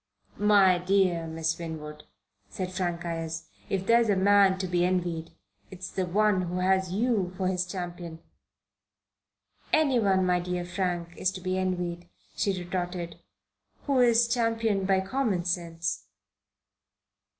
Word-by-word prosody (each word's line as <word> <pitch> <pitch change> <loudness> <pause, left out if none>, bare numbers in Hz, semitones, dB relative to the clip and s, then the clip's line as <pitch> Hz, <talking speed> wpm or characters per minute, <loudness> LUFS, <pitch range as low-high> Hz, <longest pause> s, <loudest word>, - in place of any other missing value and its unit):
"My 200 -3 +5
dear 180 -2 +1
Miss 160 +1 -2
Winwood," 150 -2 -7 0.4
said 185 -1 -4
Frank 175 -2 -2
Ayres, 165 -1 -4 0.2
"if 190 -1 -1
there's 230 +1 +4
a 200 - +4
man 195 0 +4
to 190 - -2
be 175 -1 +1
envied, 175 -3 -1 0.4
it's 185 0 -8
the 185 -2 -2
one 205 +1 +2
who 180 0 -3
has 190 0 +1
you 205 -3 0
for 185 - 0
his 180 -1 -1
champion!" 175 -2 -6 1.5
"Anyone, 235 -11 +3
my 180 -1 +2
dear 180 0 -3
Frank, 175 -2 -3
is 185 - +1
to 185 - -7
be 185 0 -1
envied," 175 -2 -3 0.3
she 195 -2 0
retorted, 175 -1 -4 0.6
"who 275 -3 +1
is 235 -1 +5
championed 225 -4 0
by 190 -1 +3
common 195 -4 -1
sense." 170 - -2
185 Hz, 135 wpm, -27 LUFS, 175-195 Hz, 1.5 s, My